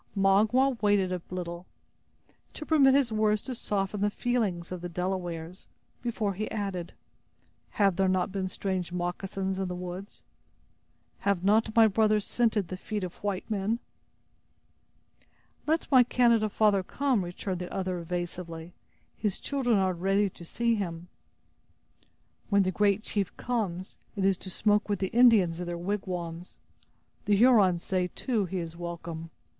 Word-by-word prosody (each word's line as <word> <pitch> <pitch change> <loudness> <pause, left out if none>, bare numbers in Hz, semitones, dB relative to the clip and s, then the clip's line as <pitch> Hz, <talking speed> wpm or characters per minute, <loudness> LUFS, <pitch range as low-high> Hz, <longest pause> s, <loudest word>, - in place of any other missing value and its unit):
Magua 220 +7 +3
waited 205 -3 +3
a 180 -1 -2
little, 175 -1 -5 0.9
to 305 - -7
permit 275 -4 +5
his 275 -4 +2
words 215 -1 +2
to 260 - -5
soften 200 -3 -2
the 205 - +3
feelings 205 -7 -1
of 180 -2 -5
the 175 - -5
Delawares, 180 -1 -4 0.3
before 220 -4 -1
he 215 +3 -4
added: 195 -5 -4 0.8
"Have 195 -4 +3
there 195 0 +3
not 185 +1 +1
been 190 -1 -2
strange 185 -2 -3
moccasins 190 +2 -3
in 190 - -1
the 180 - -4
woods? 180 +3 -7 1.0
Have 200 -3 0
not 220 +2 +3
my 225 -1 +8
brothers 215 0 +2
scented 220 -6 +1
the 185 - -5
feet 210 +1 -4
of 180 -1 -4
white 200 -2 -2
men?" 215 +1 0 1.9
"Let 320 +2 +1
my 260 -2 +8
Canada 235 -3 +3
father 205 -2 +3
come," 255 +2 0
returned 180 +1 -4
the 180 - -6
other, 185 -2 -2
evasively; 170 -1 -5 0.4
"his 210 -4 -2
children 255 -6 +1
are 190 -1 +2
ready 195 +3 +1
to 175 - -13
see 235 +7 0
him." 175 -5 -4 1.4
"When 200 -1 +4
the 185 - 0
great 205 +2 +2
chief 200 -5 -2
comes, 195 -7 -3 0.2
it 195 -2 0
is 195 -2 +2
to 190 - -7
smoke 210 +3 +1
with 205 - +1
the 190 0 -2
Indians 220 -9 +5
in 180 - -4
their 175 0 -3
wigwams. 175 -2 -4 0.7
The 205 0 +3
Hurons 200 -6 +5
say, 185 -1 0
too, 230 -7 0
he 185 +1 -4
is 165 -2 -5
welcome. 170 -1 -6
195 Hz, 150 wpm, -28 LUFS, 180-215 Hz, 1.9 s, my